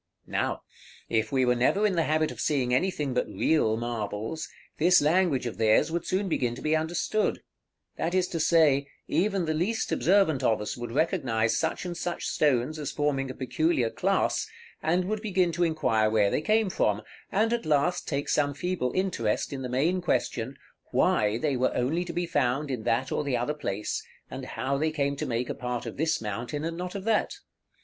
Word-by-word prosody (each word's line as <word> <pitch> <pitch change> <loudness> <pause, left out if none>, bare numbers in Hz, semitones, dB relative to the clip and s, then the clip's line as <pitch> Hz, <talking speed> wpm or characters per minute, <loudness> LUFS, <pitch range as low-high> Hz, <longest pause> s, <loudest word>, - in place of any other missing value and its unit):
Now, - - -2 0.5
if 110 -1 0
we 130 -1 +2
were 125 - +4
never 130 - +2
in 205 - +2
the 165 -3 +1
habit 155 0 +1
of - - -7
seeing 130 -5 +1
anything 150 -3 0
but 125 - 0
real 110 -9 +1
marbles, 115 +5 -4 0.3
this 175 +3 +6
language 155 -3 +2
of 120 - -5
theirs 110 +8 +4
would 170 0 -2
soon 190 +2 0
begin 125 -8 0
to - - -9
be 155 +1 +2
understood; 175 +7 0 0.5
that 175 +3 -1
is 185 -1 +2
to 165 - -3
say, 155 -4 +4 0.2
even 195 -1 +1
the 155 - 0
least 190 +9 -1
observant 180 -7 +3
of 115 -4 +2
us 105 - -4
would 120 -1 -6
recognize 120 - +1
such - - -1
and 175 -1 -4
such 175 0 -3
stones 145 +1 +1
as 145 - -3
forming 140 -2 0
a 130 - -6
peculiar 130 -1 0
class, - - 0 0.3
and 175 +3 +1
would 215 +2 -2
begin 185 -5 +1
to 170 +2 0
inquire 115 -10 +2
where 105 -2 +3
they - - +1
came 215 +3 +2
from, 105 -8 +1 0.3
and, 220 +4 +2
at 235 -7 -2
last, 155 +4 +1
take 140 -2 -2
some 145 -1 +1
feeble 175 -5 -1
interest 145 - 0
in 135 - -4
the 125 - -4
main 160 +9 +1
question, 130 -6 -1 0.3
Why 105 +1 +2
they 145 +1 0
were 130 0 +1
only 155 +9 0
to 170 - -6
be 175 +1 -1
found 140 -2 0
in 120 -4 -4
that 130 +4 0
or - - 0
the 135 -4 0
other 120 +5 -1
place, 105 -9 -3 0.3
and - - -6
how 135 +1 -2
they 155 +1 +1
came 140 -2 -1
to - - -3
make 120 +1 -1
a - - -2
part 125 -1 -4
of - - -6
this 160 +2 +1
mountain, 120 +7 -4
and 165 0 -3
not 180 +2 -5
of 195 - -4
that? 225 - +1
150 Hz, 200 wpm, -27 LUFS, 125-175 Hz, 0.5 s, this